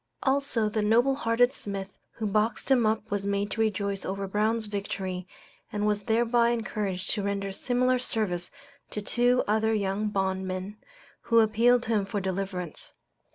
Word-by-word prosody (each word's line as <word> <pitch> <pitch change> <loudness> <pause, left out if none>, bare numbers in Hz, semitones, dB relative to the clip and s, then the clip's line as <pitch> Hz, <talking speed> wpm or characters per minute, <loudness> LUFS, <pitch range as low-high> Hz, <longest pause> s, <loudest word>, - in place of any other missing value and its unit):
Also 265 -5 +1
the 215 +1 -1
noble 235 +6 +4
hearted 245 0 +2
Smith 195 -1 -6
who 225 - -4
boxed 215 +5 0
him 245 -4 +5
up 220 0 -1
was 200 0 -1
made 200 0 -1
to 225 - -1
rejoice 200 -2 -1
over 195 +1 -3
Brown's 215 +3 +1
victory, 195 -3 -4 0.4
and 210 0 -1
was 210 -1 +1
thereby 235 +1 +3
encouraged 210 -4 -2
to 210 - 0
render 200 0 -2
similar 255 +3 +1
service 200 -8 -2 0.4
to - - -4
two 245 +4 +2
other 220 +1 +2
young 200 +1 0
bondmen, 190 0 -2 0.5
who 230 - +3
appealed 230 +3 +4
to - - -7
him 210 -3 +2
for 205 +1 -2
deliverance. 190 -2 -4
210 Hz, 155 wpm, -28 LUFS, 195-230 Hz, 0.5 s, him